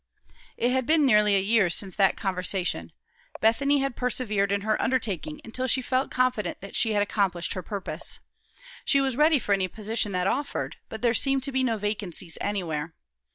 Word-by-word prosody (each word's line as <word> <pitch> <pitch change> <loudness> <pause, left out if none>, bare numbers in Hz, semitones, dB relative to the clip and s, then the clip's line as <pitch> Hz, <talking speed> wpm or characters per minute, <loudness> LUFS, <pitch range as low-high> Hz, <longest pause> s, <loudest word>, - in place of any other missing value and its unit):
It 240 +2 +1
had 260 -1 0
been 315 -1 +4
nearly 210 -4 +5
a - - +4
year 205 -1 +3
since 190 +2 -1
that 195 -2 +3
conversation. 185 -2 -2 0.5
Bethany 275 +6 +3
had 275 -3 -2
persevered 215 -5 0
in 200 0 +1
her 215 +1 0
undertaking 255 - -1
until 255 +3 -3
she 260 +1 +1
felt 255 +1 0
confident 255 -4 0
that 195 - -9
she 225 -2 +3
had 205 -1 +3
accomplished 195 -4 -1
her 185 - -4
purpose. 200 0 -5 0.7
She 275 - +3
was 270 -2 0
ready 305 +2 +5
for 210 -5 0
any 190 -1 +1
position 215 +2 -2
that 180 0 0
offered, 280 +8 -2
but 220 +1 -8
there 235 -2 +3
seemed 270 +1 +2
to 275 - -1
be 260 0 +1
no 230 -3 +1
vacancies 200 -5 -4
anywhere. 165 -6 -3
220 Hz, 185 wpm, -26 LUFS, 195-255 Hz, 0.7 s, nearly